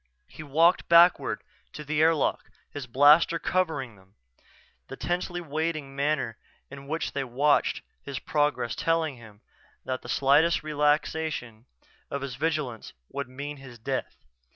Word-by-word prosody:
He - - -11
walked 160 +4 +2
backward 170 +1 +5 0.3
to 150 - -7
the 150 +1 0
airlock, 160 -2 +2 0.2
his 145 -3 -7
blaster 145 +7 +5
covering 160 -10 -1
them, 95 +1 -23 0.7
the - - -7
tensely 175 0 -2
waiting 155 -3 -3
manner 140 -5 -1 0.3
in 140 0 -10
which 160 +3 -2
they 140 - -2
watched 140 +4 +1 0.2
his 140 -2 -6
progress 145 -4 0
telling 165 -4 0
him 110 -3 -15 0.4
that 130 -1 -3
the - - -11
slightest 150 +6 +3
relaxation 150 -5 -1 0.4
of 140 -1 -4
his 135 -2 -5
vigilance 145 -4 -3 0.2
would 140 -2 -5
mean 145 +3 -6
his 130 -3 -12
death. 130 +4 -4
145 Hz, 135 wpm, -27 LUFS, 130-160 Hz, 0.7 s, backward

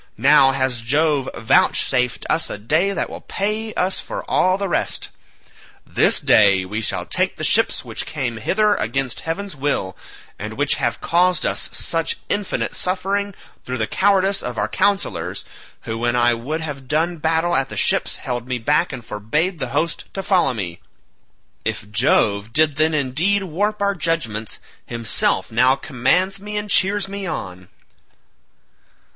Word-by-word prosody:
Now 135 +2 +6
has 130 -3 -1
Jove 145 +2 +1
vouchsafed 125 -2 +2
us - - 0
a - - -5
day 155 - +1
that - - -1
will - - -9
pay 215 +2 -2
us 185 +1 0
for - - -6
all 185 +1 +2
the 200 0 -2
rest; 175 - -1 0.8
this - - +3
day 100 -3 +4
we 105 +4 -4
shall - - -2
take - - -1
the - - -7
ships - - +3
which - - -5
came 130 -6 -3
hither 210 - +2
against 130 - -2
heaven's 190 +4 -4
will, 135 -10 -2 0.4
and - - -5
which - - +1
have - - -1
caused 180 +1 +2
us - - 0
such 165 -1 -2
infinite 205 -1 -1
suffering 195 +2 -1 0.3
through 125 0 -4
the 110 - 0
cowardice 195 - +2
of 120 -1 -5
our 105 - 0
councillors, 200 - -1 0.4
who 110 0 -5
when 120 +1 0
I 120 0 +4
would 140 +8 -4
have 140 -4 -6
done 165 +4 0
battle 160 +2 +1
at 135 0 +1
the - - -7
ships - - +2
held 120 -1 -4
me 125 -1 -1
back 150 +8 +1
and 125 -4 -8
forbade 150 - -2
the - - -2
host 155 +4 -2
to 195 - -3
follow 180 -11 +2
me; 90 -5 -5 0.8
if 105 - -4
Jove 100 +1 +2
did 155 +1 +3
then 155 +1 +2
indeed 155 +9 +2
warp 205 +4 -1
our 200 0 +2
judgements, 150 - -2 0.3
himself 115 -2 0
now 125 +4 +4
commands 180 - 0
me 210 +1 -5
and 205 0 -3
cheers 195 +1 +3
me 200 0 -5
on." 90 - -6
150 Hz, 160 wpm, -20 LUFS, 120-190 Hz, 0.8 s, Now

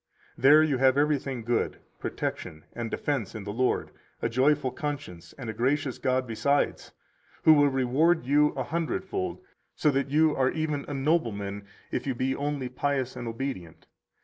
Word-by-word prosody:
148 135 +2 +5
There 155 +1 +8
you 145 -4 +1
have 130 0 +5
everything 140 -4 0
good, 120 +1 0 0.2
protection 80 0 -4
and 120 -1 -4
defense 125 -7 -2
in 110 - -5
the 100 +1 -5
Lord, 130 +3 0 0.3
a 115 - -1
joyful 130 +2 +2
conscience 95 - -6
and 130 -4 -7
a 110 - -3
gracious 135 +3 0
God 130 0 +1
besides, 120 +5 0 0.5
who 160 - +8
will 145 -1 +5
reward 135 +5 +2
you 145 +3 +4
a 130 - -2
hundredfold, 170 - -3 0.3
so 150 - +2
that 135 -1 0
you 155 +2 +3
are 130 -1 +2
even 155 -2 -2
a 145 - -4
nobleman 105 -9 -1 0.2
if - - -3
you 135 - -1
be 130 +2 0
only 145 -2 -2
pious 130 0 -2
and 120 -1 -6
obedient. 115 - -5
135 Hz, 170 wpm, -27 LUFS, 120-145 Hz, 0.5 s, There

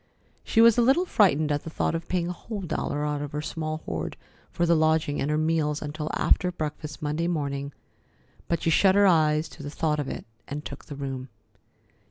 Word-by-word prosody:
She 225 - +3
was 230 0 +7
a - - +6
little 270 +10 +4
frightened 155 - +3
at 145 0 0
the - - -6
thought 160 - -1
of 165 0 -4
paying 175 -2 0
a - - -2
whole 205 +3 -6
dollar 150 -3 -2
out 150 -1 -1
of 145 -1 -6
her 150 - -2
small 155 -1 -4
hoard 80 -1 -4 0.3
for 170 - 0
the 170 - +4
lodging 155 -2 +2
and 140 - -1
her 150 - +1
meals 155 -1 +1
until 150 +1 -4
after 180 - +2
breakfast 155 -2 -5
Monday 150 +3 -1
morning, 140 -4 -2 0.8
but 170 - -1
she 165 - +2
shut 190 +3 +5
her 200 0 +6
eyes 155 -3 +3
to - - -12
the 145 - -5
thought 150 0 0
of 145 - -2
it - - -6 0.2
and 150 +1 -5
took - - -8
the 145 - -8
room. 135 -2 -5
155 Hz, 215 wpm, -26 LUFS, 145-170 Hz, 0.8 s, was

